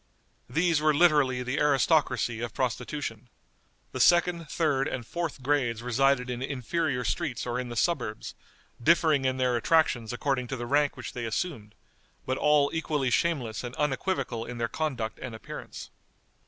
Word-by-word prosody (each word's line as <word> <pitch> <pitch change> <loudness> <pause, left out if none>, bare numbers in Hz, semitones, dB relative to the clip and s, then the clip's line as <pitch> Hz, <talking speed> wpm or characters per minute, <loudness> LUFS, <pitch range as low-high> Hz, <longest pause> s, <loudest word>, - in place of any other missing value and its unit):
These 165 -1 +2
were 155 -1 +3
literally 145 -6 +4
the 125 +3 -2
aristocracy 145 -4 +2
of 120 -2 -5
prostitution. 125 -1 -3 0.6
The - - -5
second, 175 -2 +3
third, 145 -5 +1
and 125 -3 -4
fourth 170 -2 -4
grades 125 -5 0
resided 125 +1 +2
in 125 0 -4
inferior 135 +1 -1
streets 125 +1 -2
or 125 0 -2
in 125 -1 -4
the 120 - -6
suburbs, 120 -6 -1 0.5
differing 155 -1 +3
in 130 0 +1
their 125 -1 +1
attractions 120 -3 +2
according 125 0 -1
to 135 - -3
the 120 - -4
rank 145 +2 +1
which 130 - -7
they 120 -1 -4
assumed, 110 -3 -4 0.5
but 130 - -1
all 150 -1 +4
equally 150 -5 -1
shameless 125 -7 0
and 120 +1 -6
unequivocal 140 -4 -1
in 120 +1 -7
their 115 0 0
conduct 125 -4 -3
and 125 -3 -6
appearance. 110 - -9
130 Hz, 155 wpm, -28 LUFS, 120-150 Hz, 0.6 s, literally